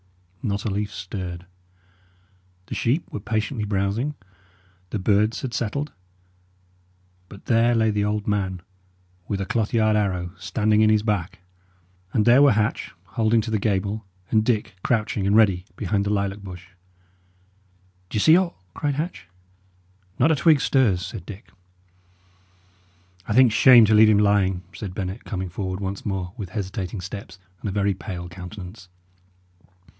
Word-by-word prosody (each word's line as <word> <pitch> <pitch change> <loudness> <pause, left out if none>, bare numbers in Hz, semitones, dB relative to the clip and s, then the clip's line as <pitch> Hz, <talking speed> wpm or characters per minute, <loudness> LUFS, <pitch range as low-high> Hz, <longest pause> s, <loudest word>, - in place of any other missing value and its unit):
Not 100 -4 -2
a 105 - 0
leaf 105 +1 -2
stirred. 90 -2 -6 1.2
The - - -7
sheep 130 +8 0
were - - -4
patiently 110 +2 -2
browsing; 105 +8 -1 0.7
the 110 - -2
birds 105 +5 +1
had 130 -3 -4
settled. 130 +6 -2 1.4
But 100 - -13
there 120 0 +3
lay 110 -1 +3
the 105 -1 0
old 105 0 -1
man, 95 -4 -1 0.6
with 100 - -2
a 100 - -2
cloth 115 -2 -1
yard 110 -2 +3
arrow 90 -4 -1
standing 105 +3 +1
in 110 - +5
his 110 -1 +3
back; 95 -4 -2 0.7
and 110 - +1
there 120 +3 +6
were 145 -2 +6
Hatch 105 0 -1
holding 115 0 +1
to 110 +1 -5
the 110 - +1
gable, 100 +1 -1 0.3
and 110 -1 +4
Dick 110 -3 0
crouching 105 -4 0
and 100 - +3
ready 95 -5 +4
behind 100 -1 -1
the 100 - -2
lilac 100 0 -1
bush. 90 -2 -10 1.4
"D'ye 105 - -1
see 160 +9 +6
aught?" 180 -1 +1 0.2
cried 145 -2 -1
Hatch. 150 - -4 0.9
"Not 145 +6 +4
a - - +4
twig 150 +1 +4
stirs," 105 - +2
said 90 -1 -8
Dick. 105 -1 -10 1.8
"I - - -1
think 125 0 +6
shame 120 0 +7
to 110 - +2
leave 110 0 +7
him 105 - +5
lying," 100 -3 +2
said 95 -4 -7
Bennet, 95 +2 -4
coming 95 -4 -4
forward 95 +1 -4
once 100 0 -4
more 95 -3 -3
with 100 -4 -6
hesitating 95 -2 -4
steps 95 0 -8 0.2
and 105 - -4
a - - -3
very 100 0 +1
pale 90 -2 -7
countenance. 90 +2 -10
105 Hz, 155 wpm, -23 LUFS, 95-110 Hz, 1.8 s, shame